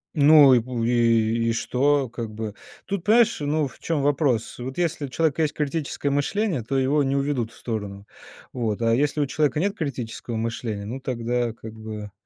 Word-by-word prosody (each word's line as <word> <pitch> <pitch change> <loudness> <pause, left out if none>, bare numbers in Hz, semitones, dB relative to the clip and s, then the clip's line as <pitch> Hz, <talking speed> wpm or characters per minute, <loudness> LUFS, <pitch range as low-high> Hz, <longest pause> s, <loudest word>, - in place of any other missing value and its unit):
Ну 145 -2 +7
и 125 - +6
в 120 0 -4
и, 115 -1 +2
и - - +1
что? 135 +3 +1
Как 115 -1 -5
бы. 110 -1 -5 0.3
Тут, 200 -3 -4
понимаешь, 225 +2 +4
ну, 150 0 0
в - - -16
чём 160 -3 -1
вопрос: 135 -6 0
вот 130 +2 -6
если 170 -4 -1
у - - -8
человека 160 +3 0
есть 150 -2 +1
критическое 150 -1 -2
мышление, 150 - 0
то 135 +5 -2
его 135 +3 +2
не 135 0 0
уведут 135 -5 -1
в - - -18
сторону, 100 -4 -5 0.5
вот. 115 -3 -2
А 115 0 +3
если 145 +4 +1
у - - +2
человека 150 +1 0
нет 200 +2 0
критического 125 - -4
мышления, 110 -2 -3
ну, 125 +6 -5
тогда, 120 -2 -2
как 110 -1 -10
бы, 110 -2 -7
130 Hz, 190 wpm, -24 LUFS, 115-145 Hz, 0.5 s, Ну